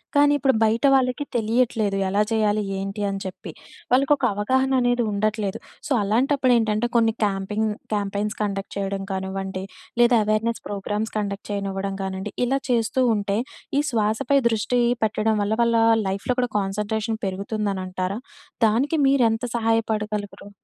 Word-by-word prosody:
కానీ 290 Hz, 0 st, +5 dB
ఇప్పుడు 270 Hz, 0 st, +3 dB
బయట 225 Hz, +5 st, +2 dB
వాళ్ళకి 260 Hz, +2 st, +1 dB
తెలియట్లేదు. 225 Hz, -3 st, +1 dB
ఎలా 200 Hz, +2 st, +1 dB
చేయాలి 215 Hz, -1 st, +2 dB, 0.2 s
ఏంటి 195 Hz, +2 st, -4 dB
అని 195 Hz, 0 st, -3 dB
చెప్పి. 185 Hz, -, -7 dB, 0.4 s
వాళ్ళకి 275 Hz, +3 st, +4 dB
ఒక 270 Hz, -, 0 dB
అవగాహన 260 Hz, +6 st, +1 dB
అనేది 245 Hz, 0 st, +2 dB
ఉండట్లేదు. 210 Hz, -1 st, -1 dB, 0.3 s
సో, -, -, -10 dB
అలాంటప్పుడేంటంటే 240 Hz, -1 st, +2 dB
కొన్ని 225 Hz, -1 st, +4 dB
క్యాంపింగ్ 205 Hz, +2 st, -1 dB, 0.2 s
క్యాంపెయిన్స్ 205 Hz, +1 st, -1 dB
కండక్ట్ 200 Hz, -1 st, -3 dB
చేయడం 195 Hz, 0 st, -2 dB
కానివ్వండి 190 Hz, 0 st, -4 dB, 0.4 s
లేదా 240 Hz, 0 st, +5 dB
అవేర్నెస్ 215 Hz, +2 st, 0 dB
ప్రోగ్రామ్స్ 205 Hz, +2 st, -3 dB
కండక్ట్ 200 Hz, -1 st, -3 dB
చేయనివ్వడం 195 Hz, -1 st, -3 dB
కానివ్వండి. 190 Hz, +1 st, -4 dB
ఇలా 270 Hz, +3 st, +1 dB
చేస్తూ 240 Hz, +1 st, +1 dB
ఉంటే 200 Hz, 0 st, -1 dB, 0.4 s
ఈ -, -, +4 dB
శ్వాసపై 220 Hz, +5 st, +2 dB
దృష్టి 230 Hz, +2 st, +1 dB, 0.2 s
పెట్టడం 220 Hz, 0 st, +1 dB
వల్ల 205 Hz, +2 st, 0 dB
వాళ్ళ 235 Hz, 0 st, +2 dB, 0.3 s
లైఫ్‍లో 195 Hz, +6 st, -1 dB
కూడా 245 Hz, -, -1 dB
కాన్సంట్రేషన్ 210 Hz, +3 st, -2 dB
పెరుగుతుందనంటారా? 190 Hz, -1 st, -3 dB, 0.5 s
దానికి 255 Hz, +9 st, +1 dB
మీరు 270 Hz, -2 st, +4 dB
ఎంత 225 Hz, +1 st, -3 dB
సహాయపడగలగరు? 215 Hz, -3 st, -1 dB
215 Hz, 135 wpm, -23 LUFS, 200-235 Hz, 0.5 s, కానీ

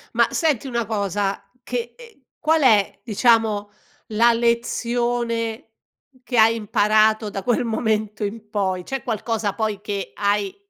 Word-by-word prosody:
Ma -, -, +4 dB
senti 295 Hz, -6 st, 0 dB
una 235 Hz, -3 st, -2 dB
cosa 200 Hz, -2 st, -2 dB, 0.2 s
che 240 Hz, -1 st, -4 dB
e 465 Hz, -, -16 dB
qual 315 Hz, 0 st, +2 dB
è, 215 Hz, -7 st, +3 dB
diciamo, 220 Hz, -2 st, +2 dB, 0.4 s
la 230 Hz, +2 st, +4 dB
lezione 235 Hz, -1 st, -1 dB, 0.5 s
che 245 Hz, -1 st, -3 dB
hai 225 Hz, 0 st, +6 dB
imparato 215 Hz, 0 st, +2 dB
da 195 Hz, -, -4 dB
quel 240 Hz, +5 st, +1 dB
momento 215 Hz, -2 st, -1 dB
in 210 Hz, +1 st, -5 dB
poi? 190 Hz, -4 st, -1 dB
C'è 270 Hz, +6 st, -4 dB
qualcosa 225 Hz, -3 st, -2 dB
poi 215 Hz, -3 st, -2 dB
che 200 Hz, -2 st, -4 dB
hai 205 Hz, -1 st, 0 dB
220 Hz, 135 wpm, -22 LUFS, 205-235 Hz, 0.5 s, hai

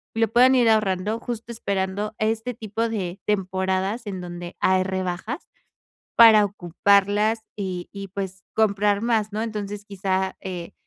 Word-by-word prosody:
lo 225 Hz, 0 st, +3 dB
puedan 250 Hz, +3 st, +5 dB
ir 240 Hz, -3 st, +4 dB
ahorrando, 210 Hz, 0 st, +1 dB
justo 235 Hz, -1 st, -5 dB
esperando 200 Hz, 0 st, -2 dB
este 225 Hz, +3 st, -1 dB
tipo 225 Hz, +1 st, -3 dB
de 190 Hz, -4 st, -4 dB
temporadas 190 Hz, +2 st, -1 dB
en 190 Hz, -2 st, -4 dB
donde 175 Hz, 0 st, -7 dB
hay 185 Hz, 0 st, +3 dB
rebajas, 190 Hz, -, -4 dB, 0.7 s
para 220 Hz, -2 st, +8 dB
ocuparlas 200 Hz, +3 st, +2 dB, 0.2 s
y 185 Hz, -3 st, -4 dB
y, 200 Hz, -1 st, -7 dB
pues, 190 Hz, 0 st, -6 dB
comprar 205 Hz, -1 st, +2 dB
más, 220 Hz, -3 st, +1 dB
¿no? 215 Hz, -, -1 dB
Entonces 205 Hz, -2 st, -5 dB
quizá, 190 Hz, -1 st, -1 dB
eh, 180 Hz, -3 st, -6 dB
200 Hz, 140 wpm, -24 LUFS, 190-220 Hz, 0.7 s, para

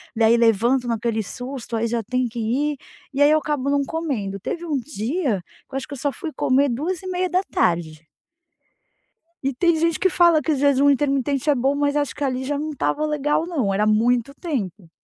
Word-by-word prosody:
Daí 225 Hz, +1 st, +4 dB
levanto 235 Hz, +3 st, +3 dB
naquele 230 Hz, -1 st, -1 dB
susto, 245 Hz, +2 st, -6 dB
aí 225 Hz, +1 st, 0 dB
já 230 Hz, 0 st, -1 dB
tem 250 Hz, +3 st, -1 dB
que 235 Hz, +1 st, -7 dB
ir, 275 Hz, +6 st, 0 dB, 0.4 s
e 280 Hz, -, -1 dB
aí 290 Hz, -, +7 dB
eu 310 Hz, -, +5 dB
acabo 295 Hz, -3 st, -1 dB
não 285 Hz, 0 st, +2 dB
comendo. 250 Hz, -13 st, -3 dB
Teve 345 Hz, -, -4 dB
um 305 Hz, -3 st, -1 dB
dia 250 Hz, -, -2 dB, 0.3 s
que 270 Hz, -, -9 dB
eu -, -, +1 dB
acho 270 Hz, -, -5 dB
que 290 Hz, -, -8 dB
eu 270 Hz, -, -7 dB
só 285 Hz, -, 0 dB
fui 315 Hz, +4 st, -6 dB
comer 275 Hz, +2 st, +3 dB
14h30. 335 Hz, -, -1 dB, 1.4 s
E 275 Hz, 0 st, 0 dB
tem 340 Hz, +5 st, +2 dB
gente 330 Hz, 0 st, +1 dB
que 375 Hz, -, +3 dB
fala 340 Hz, -3 st, +4 dB
que 310 Hz, -, -1 dB
o -, -, +2 dB
jejum 280 Hz, 0 st, +3 dB
intermitente 275 Hz, 0 st, +1 dB
é 290 Hz, -, +4 dB
bom, 270 Hz, +3 st, +1 dB
mas 285 Hz, 0 st, 0 dB
acho 290 Hz, -1 st, -1 dB
que 290 Hz, -, -4 dB
ali 260 Hz, -1 st, -1 dB
já 285 Hz, +2 st, -2 dB
não 305 Hz, +1 st, -3 dB
estava 300 Hz, +1 st, -1 dB
legal 300 Hz, +1 st, 0 dB
não, 265 Hz, -, -1 dB
era 210 Hz, +2 st, +1 dB
muito 235 Hz, +4 st, +2 dB
tempo. 205 Hz, -, -4 dB
275 Hz, 200 wpm, -22 LUFS, 235-300 Hz, 1.4 s, aí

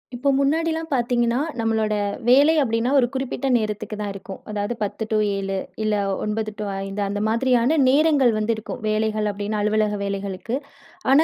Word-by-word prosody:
இப்போ 275 Hz, +3 st, 0 dB
முன்னாடிலாம் 320 Hz, +3 st, +1 dB
பார்த்தீங்கன்னா, 240 Hz, -1 st, +1 dB, 0.2 s
நம்மளோட 220 Hz, -1 st, +1 dB, 0.4 s
வேலை 285 Hz, +5 st, +6 dB
அப்படின்னா, 230 Hz, 0 st, 0 dB
ஒரு 245 Hz, -, +3 dB
குறிப்பிட்ட 270 Hz, +1 st, -2 dB
நேரத்துக்கு 215 Hz, -1 st, -3 dB
தான் 205 Hz, -1 st, -3 dB
இருக்கும். 195 Hz, -1 st, -9 dB
அதாவது 205 Hz, +2 st, -2 dB
10 210 Hz, +2 st, -3 dB
டூ 215 Hz, -, +3 dB, 0.2 s
7, 195 Hz, 0 st, -2 dB, 0.3 s
இல்ல 215 Hz, -1 st, +1 dB, 0.3 s
9 215 Hz, 0 st, -2 dB
டூ -, -, -2 dB, 0.2 s
5, 195 Hz, +1 st, -4 dB
அந்த 205 Hz, +1 st, -2 dB
மாதிரியான 245 Hz, +5 st, +2 dB
நேரங்கள் 280 Hz, -3 st, +4 dB
வந்து 215 Hz, +2 st, +1 dB
இருக்கும். 220 Hz, -, -7 dB
வேலைகள் 215 Hz, 0 st, 0 dB
அப்படின்னு 205 Hz, +1 st, -3 dB
அலுவலக 210 Hz, 0 st, +1 dB
வேலைகளுக்கு. 200 Hz, +3 st, -3 dB, 0.6 s
ஆனா, 285 Hz, +4 st, +7 dB
220 Hz, 155 wpm, -23 LUFS, 210-255 Hz, 0.6 s, ஆனா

